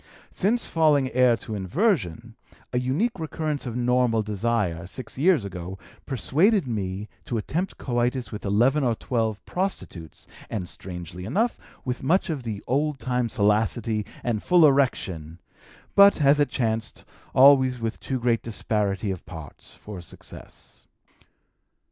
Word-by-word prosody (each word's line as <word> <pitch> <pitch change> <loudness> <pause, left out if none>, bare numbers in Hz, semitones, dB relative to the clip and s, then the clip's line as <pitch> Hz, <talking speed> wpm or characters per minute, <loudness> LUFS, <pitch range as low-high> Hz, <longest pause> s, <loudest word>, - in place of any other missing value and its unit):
Since 225 +5 +1
falling 150 -5 +2
heir 125 -2 +4
to 110 - -7
inversion, 115 - 0 0.4
a 125 - +2
unique 160 - 0
recurrence 155 -3 -3
of 120 - -4
normal 125 -2 +2
desire, 105 -5 -1
six 115 +4 -7
years 160 - +4
ago, 90 0 -6 0.3
persuaded 165 - +2
me 100 -3 -3 0.2
to 125 -6 -2
attempt 170 - -3
coitus 120 0 -1
with 105 - -6
eleven 120 +9 +3
or 120 -3 +2
twelve 110 -3 -2
prostitutes, 175 - -4 0.2
and, 100 -6 -3
strangely 90 0 -8
enough, 210 - 0 0.3
with 125 -1 -3
much 175 +5 +2
of 145 -4 -3
the 110 -4 -5
old 145 +3 0
time 125 -2 -1
salacity 110 0 +1 0.2
and 115 -4 -1
full 175 -3 +5
erection, 95 - +1 0.5
but, 200 -2 +7
as 145 0 +5
it 145 - +3
chanced, 115 -2 -2 0.3
always 130 -2 +6
with 115 0 -3
too 130 -2 -3
great 120 -1 +1
disparity 105 -3 -1
of 95 - -6
parts 80 -5 -10
for 105 -4 -9
success." 85 - -12
120 Hz, 135 wpm, -25 LUFS, 105-140 Hz, 0.5 s, but